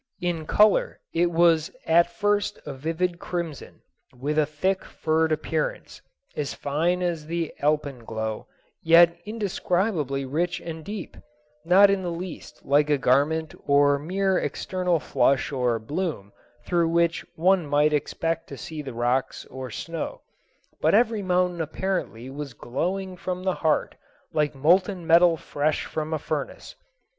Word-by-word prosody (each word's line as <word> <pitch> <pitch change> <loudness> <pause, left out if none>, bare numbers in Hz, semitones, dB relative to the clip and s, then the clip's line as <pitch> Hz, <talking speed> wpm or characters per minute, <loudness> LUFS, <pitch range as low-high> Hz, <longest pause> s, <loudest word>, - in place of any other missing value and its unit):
In 175 -4 -2
color 210 -1 +3
it 170 +1 +2
was 165 -1 +3 0.2
at 170 +1 +4
first 205 0 0
a 145 - -5
vivid 165 +5 -2
crimson, 170 -6 -5 0.4
with 150 +4 0
a 150 - +2
thick, 185 +6 -1
furred 160 0 0
appearance, - - -2 0.3
as 145 -2 -3
fine 170 +6 0
as 165 -4 -2
the 170 -1 -2
alpenglow, 120 -7 -2 0.3
yet 170 +1 +6
indescribably 185 - -1
rich 170 +6 -1
and 160 -1 -7
deep—not 165 - +1
in 195 -1 0
the 180 - -3
least 175 +1 -8
like 145 +2 +3
a 145 - +3
garment 145 +5 +2
or 145 0 +4
mere 190 +4 0
external 180 -3 -1
flush 135 -1 +1
or 125 -4 +1
bloom 145 - -4 0.3
through 170 -2 +1
which 170 0 +1
one 180 0 +3
might 145 +1 +3
expect 165 +3 -1
to 140 - -8
see 155 +2 -6
the 135 -5 -8
rocks 120 +3 -1
or 130 0 -6
snow, 165 - -5 0.6
but - - +4
every 225 -1 +3
mountain 180 -2 +1
apparently 160 -7 -3
was 140 -2 -7
glowing 185 +9 -3
from 180 0 -4
the 185 -1 +1
heart 155 -2 +1 0.4
like 150 -2 0
molten 180 +5 +2
metal 170 0 +5
fresh 150 0 -1
from 155 0 -4
a 160 - +1
furnace. - - -5
165 Hz, 140 wpm, -25 LUFS, 145-180 Hz, 0.6 s, yet